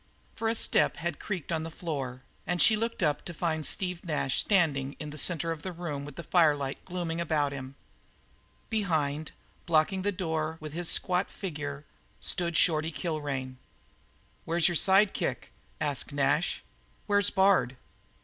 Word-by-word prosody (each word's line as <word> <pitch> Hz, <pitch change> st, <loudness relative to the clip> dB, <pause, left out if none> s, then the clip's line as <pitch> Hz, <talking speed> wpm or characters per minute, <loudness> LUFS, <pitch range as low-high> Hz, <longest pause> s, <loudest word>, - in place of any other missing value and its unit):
For 225 Hz, -, -2 dB
a 225 Hz, -, +2 dB
step -, -, +3 dB
had 170 Hz, -1 st, -3 dB
creaked 185 Hz, -7 st, -4 dB
on 160 Hz, -1 st, 0 dB
the 165 Hz, -, -4 dB
floor, 135 Hz, -7 st, -5 dB, 0.2 s
and 175 Hz, 0 st, 0 dB
she 220 Hz, +5 st, +7 dB
looked 230 Hz, -2 st, -2 dB
up 150 Hz, -2 st, +1 dB
to 175 Hz, -, -7 dB
find 160 Hz, -2 st, -1 dB
Steve 180 Hz, +4 st, -1 dB
Nash 150 Hz, -6 st, 0 dB
standing 145 Hz, -9 st, +2 dB
in 150 Hz, -1 st, -5 dB
the -, -, -8 dB
centre 165 Hz, 0 st, +1 dB
of 160 Hz, -2 st, -4 dB
the 185 Hz, -, -4 dB
room 160 Hz, -5 st, -5 dB
with 145 Hz, -1 st, -9 dB
the 170 Hz, -, -6 dB
firelight 150 Hz, -6 st, +2 dB
gloomily 170 Hz, -2 st, -3 dB
about 150 Hz, -4 st, +1 dB
him; 135 Hz, -1 st, -7 dB, 1.0 s
behind, 155 Hz, -8 st, 0 dB, 0.4 s
blocking 170 Hz, +3 st, +3 dB
the 205 Hz, +2 st, +1 dB
door 160 Hz, -4 st, -2 dB
with 155 Hz, -1 st, -7 dB
his 175 Hz, 0 st, -2 dB
squat 180 Hz, +1 st, +2 dB
figure, 150 Hz, -6 st, -5 dB, 0.3 s
stood 170 Hz, -2 st, 0 dB
Shorty 160 Hz, -1 st, +3 dB
Kilrain. 145 Hz, -6 st, -3 dB, 0.9 s
"Where's 165 Hz, +1 st, +2 dB
your 175 Hz, -, +1 dB
side 195 Hz, +4 st, +5 dB
kicker?" -, -, -2 dB, 0.3 s
asked 145 Hz, -1 st, -2 dB
Nash. 145 Hz, +4 st, +1 dB, 0.4 s
"Where's 205 Hz, 0 st, +3 dB
Bard?" 190 Hz, -10 st, +3 dB
160 Hz, 160 wpm, -29 LUFS, 145-180 Hz, 1.0 s, she